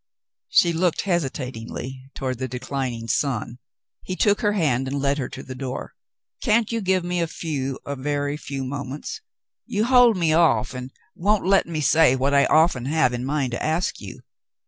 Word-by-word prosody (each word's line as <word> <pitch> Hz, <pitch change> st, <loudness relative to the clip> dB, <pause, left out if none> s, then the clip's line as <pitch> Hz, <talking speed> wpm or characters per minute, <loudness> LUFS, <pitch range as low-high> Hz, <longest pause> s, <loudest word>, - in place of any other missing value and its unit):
She 170 Hz, -1 st, +4 dB
looked 170 Hz, 0 st, +1 dB
hesitatingly 130 Hz, -, -4 dB
toward 130 Hz, -3 st, -3 dB
the 130 Hz, -1 st, -3 dB
declin 130 Hz, +1 st, -3 dB
ing 115 Hz, -1 st, -7 dB
sun. 120 Hz, -2 st, -1 dB, 0.4 s
He 185 Hz, -, -5 dB
took 205 Hz, +3 st, +2 dB
her 210 Hz, -2 st, +2 dB
hand 135 Hz, -9 st, +1 dB
and 140 Hz, +2 st, -2 dB
led 140 Hz, +1 st, +1 dB
her 130 Hz, -, -3 dB
to -, -, -8 dB
the 130 Hz, -, -7 dB
door. 130 Hz, 0 st, -5 dB, 0.2 s
" -, -, -50 dB
Can't 230 Hz, -1 st, +2 dB
you 230 Hz, -1 st, -1 dB
give 190 Hz, -2 st, +1 dB
me 175 Hz, 0 st, -1 dB
a 170 Hz, -, 0 dB
few, 140 Hz, -5 st, -3 dB
a 140 Hz, -, -3 dB
very 145 Hz, +1 st, -2 dB
few 140 Hz, -2 st, -5 dB
moments? 140 Hz, -, -5 dB, 0.5 s
You 210 Hz, +1 st, 0 dB
hold 245 Hz, -3 st, +5 dB
me 165 Hz, -3 st, +2 dB
off 135 Hz, -8 st, +3 dB
and 125 Hz, 0 st, -6 dB, 0.2 s
won't 205 Hz, +2 st, +1 dB
let 195 Hz, -2 st, +3 dB
me 160 Hz, -2 st, -3 dB
say 150 Hz, -1 st, +5 dB
what 135 Hz, +2 st, 0 dB
I 140 Hz, 0 st, +5 dB
often 155 Hz, -6 st, +3 dB
have 150 Hz, -3 st, +2 dB
in 125 Hz, 0 st, -3 dB
mind 140 Hz, -2 st, -1 dB
to 120 Hz, -, -4 dB
ask 160 Hz, +3 st, -1 dB
you." -, -, -9 dB
145 Hz, 190 wpm, -23 LUFS, 130-175 Hz, 0.5 s, hold